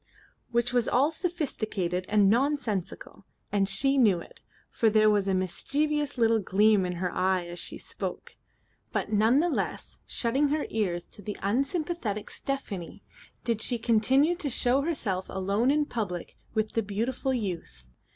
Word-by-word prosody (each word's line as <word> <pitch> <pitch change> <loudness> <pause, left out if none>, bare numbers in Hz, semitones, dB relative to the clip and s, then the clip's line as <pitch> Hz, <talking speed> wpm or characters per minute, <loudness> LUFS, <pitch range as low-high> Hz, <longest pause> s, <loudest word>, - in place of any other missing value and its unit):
Which 235 +1 0
was 245 -2 +2
all 280 +5 +3
sophistical 220 - -2
and 210 -2 +4
nonsensical; 240 - -1 0.3
and 200 -1 +2
she 275 +5 +3
knew 205 -8 +4
it, - - -13 0.3
for 225 - +3
there 215 0 +5
was 205 -2 +1
a 190 - +2
mischievous 290 - -1
little 225 -1 +3
gleam 205 0 +3
in 180 - -3
her 180 0 -2
eye 185 -1 +1
as 175 0 -6
she - - -3
spoke. - - -6 0.6
But 215 - -2
none 225 +7 +4
the 350 - +2
less, 340 - -3
shutting 265 +5 +1
her 295 +1 0
ears 180 -6 -1
to - - -13
the 205 +1 -5
unsympathetic 265 - -1
Stephanie, 210 -11 -5 0.4
did 230 -2 -1
she 245 - +2
continue 255 +8 +3
to 305 -6 -2
show 250 +2 +2
herself 220 - -2
alone 200 +6 0
in 295 +1 +3
public 200 -10 -4 0.2
with 215 0 0
the 225 - 0
beautiful 230 +6 -2
youth. 175 - -4
220 Hz, 155 wpm, -28 LUFS, 195-275 Hz, 0.6 s, there